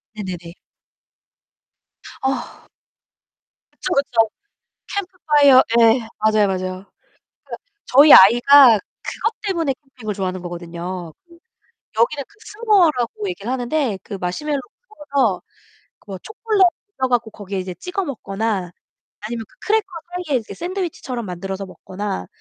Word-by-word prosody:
네네네. 180 -4 -6 1.7
어. 265 0 -3 1.2
그쵸, 360 - -1
그쵸. 230 -5 +2 0.7
캠프파이어, 300 -8 +4 0.2
예, 225 0 +4
맞아요, 215 -1 +3
맞아요. 185 0 -3
그 - - -38 0.9
저희 285 +3 +7
아이가 240 +3 +8 0.2
그것 - - -2
때문에 330 -8 0 0.2
캠핑을 215 -5 -5
좋아하는 185 -2 -3
거거든요. 175 -1 -6
그 340 0 -18 0.6
여기는 280 +5 +2
그 410 - -25
스모어라고 410 - +1
얘기를 250 - -5
하는데 255 -3 -1
그 200 - -7
마시멜로를 275 +12 -2 0.5
구워서 245 -10 +1 0.7
뭐 195 - -6
초콜릿 435 - -2 0.4
녹여 260 -1 0
갖고 235 -2 +1
거기에 200 -2 -6
이제 185 -1 -5
찍어 365 - -4
먹거나 205 - -3 0.5
아니면 225 +1 -5
그 - - -26
크래커 435 -1 +2 0.4
사이에 275 -3 +2
이제 215 -3 -10
샌드위치처럼 340 - -4
만들어서 190 +2 -5
먹거나 185 - -6
230 Hz, 295 characters per minute, -20 LUFS, 195-295 Hz, 1.7 s, 아이가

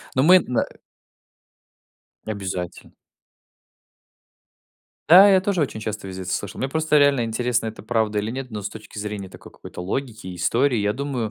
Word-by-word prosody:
но 130 - +3
мы, 185 +4 +8
на 125 -8 -1 1.6
Обязательно. 95 -4 -5 2.2
Да, 190 +5 +9
я 190 -1 +5
тоже 190 -2 -1
очень 140 -7 -1
часто 105 -2 -5
везде 95 0 -6
это 90 - -4
слышал. 100 - -4
Мне 130 - -1
просто 155 +1 +2
реально 140 -4 +4
интересно, 115 +1 -1
это 110 - -7
правда 110 -2 0
или 105 +2 -2
нет, 130 0 -6
но 105 -2 -5
с 105 - -3
точки 105 0 -11
зрения 105 -2 -5
такой - - -14
какой-то - - -10
логики 110 +3 -4
и 90 - -6
истории, 120 +8 +1
я 105 0 +1
думаю, 130 -4 -3
115 Hz, 165 wpm, -23 LUFS, 105-135 Hz, 2.2 s, Да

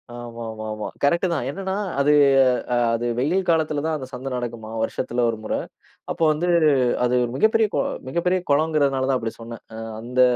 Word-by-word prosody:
ஆமாமாமா 110 -3 -6 0.2
கரெக்ட் 170 +6 +3
தான். 145 -7 -2
என்னன்னா 190 +6 -4 0.3
அது 140 +1 +4 0.6
அ - - +3 0.2
அது 120 +1 -3
வெயில் 175 +9 0
காலத்துல 155 -3 +1
தான் 160 0 0
அந்தச் 130 -3 -7
சந்த 125 +2 -6
நடக்குமா, 120 -3 -5
வருஷத்துல 120 +2 -2
ஒரு 115 - -2
முற. 110 - -3 0.6
அப்போ 170 - -6
வந்து 155 +4 -1 0.6
அது 125 0 +2 0.2
மிகப்பெரிய 220 +9 +3
கோ - - +2 0.3
மிகப்பெரிய 180 +6 +1
குளங்கறதுனால 140 -3 +2
தான் 130 - +2
அப்டி 115 0 -4
சொன்னேன். 115 0 -9
அ - - -7 0.2
அந்த 125 +2 -2
130 Hz, 160 wpm, -23 LUFS, 120-160 Hz, 0.6 s, அது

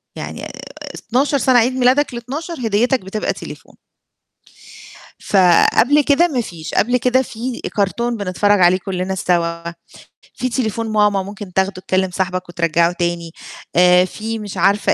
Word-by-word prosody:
يعني - - -7
آآ، - - -7 0.6
12 275 +4 +2
سنة، 255 -1 +4
عيد 245 +3 +1
ميلادك 260 +2 +2
ال12 260 +3 -5
هديتك 240 +5 +1
بتبقى 195 +3 -3
تليفون. - - -11 1.4
فقبل 200 - +4
كده 295 +5 +3
ما 265 -7 -1
فيش، 170 -7 -8
قبل 245 +3 +2
كده 250 +1 +2
في 240 0 -6 0.2
كارتون 230 +4 -1
بنتفرّج 205 +1 +1
عليه 180 +1 +5
كلّنا 190 0 -3
سوا، 170 -2 -1 0.7
في 255 - -3
تليفون 230 -2 -2
ماما 210 -2 +2
ممكن 200 -1 -9
تاخده 190 +1 +1
تكلم 190 0 0
صاحبك 185 -1 -3
وترجّعه 170 0 +1
تاني، 170 -1 -3 0.4
آآ، 180 +1 +5
في 220 +4 -5
مش 205 -2 -7
عارفة 200 +3 +2
205 Hz, 140 wpm, -18 LUFS, 185-245 Hz, 1.4 s, عليه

